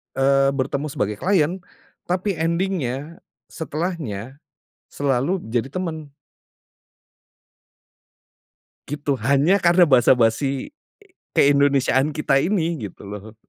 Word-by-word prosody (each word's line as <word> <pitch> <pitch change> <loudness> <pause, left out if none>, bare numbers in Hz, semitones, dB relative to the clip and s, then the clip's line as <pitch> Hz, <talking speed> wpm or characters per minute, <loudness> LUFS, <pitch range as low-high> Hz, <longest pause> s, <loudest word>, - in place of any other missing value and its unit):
eee, 135 0 +3
bertemu 140 +2 -2
sebagai 105 -3 -2
klien 180 - 0 0.4
tapi 185 +2 -1
ending-nya, 165 -3 -2 0.3
setelahnya, 150 - -5 0.5
selalu 140 +6 0
jadi 120 +3 -2
teman. 160 -4 -5 2.8
Gitu, 145 -1 -2
hanya 150 +8 +3
karena 175 +1 +5
basa 130 -3 +5
basi 135 - 0 0.6
ke-Indonesiaan 140 -1 +3
kita 135 -2 +2
ini 165 - -1
gitu - - -17
loh. 105 +2 -9
140 Hz, 90 wpm, -22 LUFS, 130-170 Hz, 2.8 s, karena